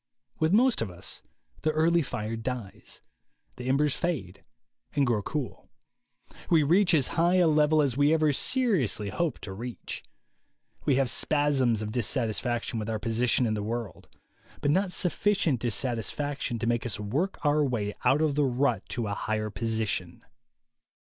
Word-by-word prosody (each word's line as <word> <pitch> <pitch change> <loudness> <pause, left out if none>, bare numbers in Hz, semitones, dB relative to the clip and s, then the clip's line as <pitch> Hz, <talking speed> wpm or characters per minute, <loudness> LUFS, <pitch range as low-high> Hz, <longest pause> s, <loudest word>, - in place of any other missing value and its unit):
With 160 +1 +2
most 240 - +4
of 115 - -2
us 90 0 -7 0.4
the 155 - +1
early 165 +2 +3
fire 110 -6 -4
dies; 115 -3 -6 0.6
the 125 +1 -4
embers 140 +1 +2
fade 145 - -3 0.5
and 140 - +3
grow 115 -4 +1
cool. 145 +4 -5 0.8
We 160 -3 +5
reach 175 +4 +4
as 140 -5 +3
high 170 +2 +2
a 180 -2 +5
level 155 0 +4
as 135 -4 0
we 145 +2 +3
ever 155 -2 +3
seriously 160 - +1
hope 165 - -1
to 95 - -7
reach. 120 +4 -7 0.8
We 140 - +3
have 135 0 +2
spasms 135 -6 +1
of 105 - -4
dissatisfaction 115 0 -1
with 110 +1 -4
our 110 - -1
position 115 +3 +1
in 110 - 0
the 105 - -2
world, 110 -4 -5 0.5
but 145 - +1
not 190 +3 +1
sufficient 180 - +1
dissatisfaction 120 +3 -2
to 115 - -3
make 120 -1 +1
us 120 -3 -4
work 135 - -1
our 150 +1 +3
way 110 -7 -1
out 150 +4 +3
of 155 -2 +2
the 145 0 +2
rut 125 -5 +1
to 120 - -2
a 100 - -2
higher 110 +1 -2
position. 110 -5 -3
125 Hz, 160 wpm, -28 LUFS, 110-155 Hz, 0.8 s, We